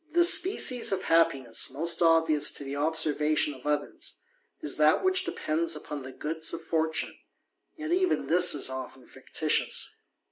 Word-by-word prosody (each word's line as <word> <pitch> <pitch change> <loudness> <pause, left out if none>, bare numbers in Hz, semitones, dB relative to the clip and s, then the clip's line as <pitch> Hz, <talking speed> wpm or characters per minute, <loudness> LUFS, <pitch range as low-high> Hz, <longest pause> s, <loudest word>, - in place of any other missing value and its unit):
The 345 +1 +4
species 345 - +5
of 190 -1 -3
happiness 135 -8 0
most 165 +7 -3
obvious 165 -3 +2
to - - -6
the 135 0 -7
observatio 150 -1 0
of 130 - -11
others, 150 -1 -4 0.4
is 145 - -2
that 155 - +2
which 375 0 +1
depends 165 - -2
upon 150 -1 -8
the 130 0 -10
goods 160 +4 -2
of 165 - -10
fortune 160 -1 -3 0.6
yet 315 0 -7
even 370 0 0
this 175 -1 +5
is 145 - -1
often 130 0 -8
fictitious. - - -2
160 Hz, 150 wpm, -27 LUFS, 145-175 Hz, 0.6 s, species